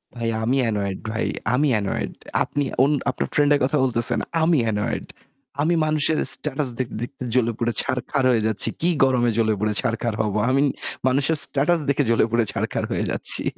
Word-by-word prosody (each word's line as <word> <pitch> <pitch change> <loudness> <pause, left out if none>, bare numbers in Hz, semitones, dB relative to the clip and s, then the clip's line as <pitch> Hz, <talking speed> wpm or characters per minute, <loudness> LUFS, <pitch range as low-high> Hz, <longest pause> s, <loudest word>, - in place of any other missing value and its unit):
ভাই 115 -1 -2
আমি 125 +4 +1
annoyed 100 -3 -2
ভাই 110 - -2 0.3
আমি 145 +4 +2
annoyed. 100 - -3 0.3
আপনি 145 - -2 0.2
অন 140 - +3 0.2
আপনার - - -2
ফ্রেন্ডের 145 0 +3
কথা 135 +3 +1
বলতেছেন, 120 -3 +1 0.2
আমি 160 -3 +3
annoyed 105 -1 -2 0.5
আমি 165 +4 +2
মানুষের 155 0 +1 0.2
স্ট্যাটাস 150 -2 -2
দেখতে, 125 -2 -3
দেখতে 130 +1 -7
জ্বলে 120 -2 +2
পুড়ে 120 0 -1
ছারখার 130 +2 -2
হয়ে 115 -3 +1
যাচ্ছি। 110 -2 0
কি 175 - +3
গরমে 125 -2 +3
জ্বলে 110 -1 +2
পুড়ে 105 0 0
ছারখার 115 0 -1
হব? 105 -2 -1 0.2
আমি 135 +2 +3 0.5
মানুষের 140 +4 +2
স্ট্যাটাস 155 +5 +1
দেখে 140 +1 +2
জ্বলে 115 -1 +3
পুড়ে 115 -1 +2
ছারখার - - -2
হয়ে - - -1
যাচ্ছি। - - 0
130 Hz, 170 wpm, -22 LUFS, 115-145 Hz, 0.5 s, অন